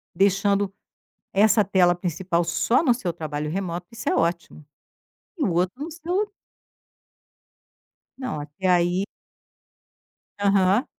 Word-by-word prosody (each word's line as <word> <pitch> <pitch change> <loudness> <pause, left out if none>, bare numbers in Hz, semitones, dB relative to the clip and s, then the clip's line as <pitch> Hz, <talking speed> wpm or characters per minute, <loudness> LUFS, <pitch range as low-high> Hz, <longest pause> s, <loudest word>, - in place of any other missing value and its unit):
deixando 200 +1 +2 0.6
essa 210 +2 +4
tela 185 -3 +4
principal 175 0 -1
só 230 - +2
no 255 -7 +4
seu 190 -8 -3
trabalho 150 -2 -4
remoto, 175 0 -3
isso 230 -1 -3
é - - +1
ótimo, 170 -2 -1 0.7
e 300 - +1
o 190 - +1
outro 180 +10 0
no 320 - -5
seu 355 +6 -2 1.9
Não, 255 - -4
até 150 +6 -5
aí. 180 +1 +3 1.3
Aham. 200 +3 +3
190 Hz, 115 wpm, -24 LUFS, 170-215 Hz, 1.9 s, essa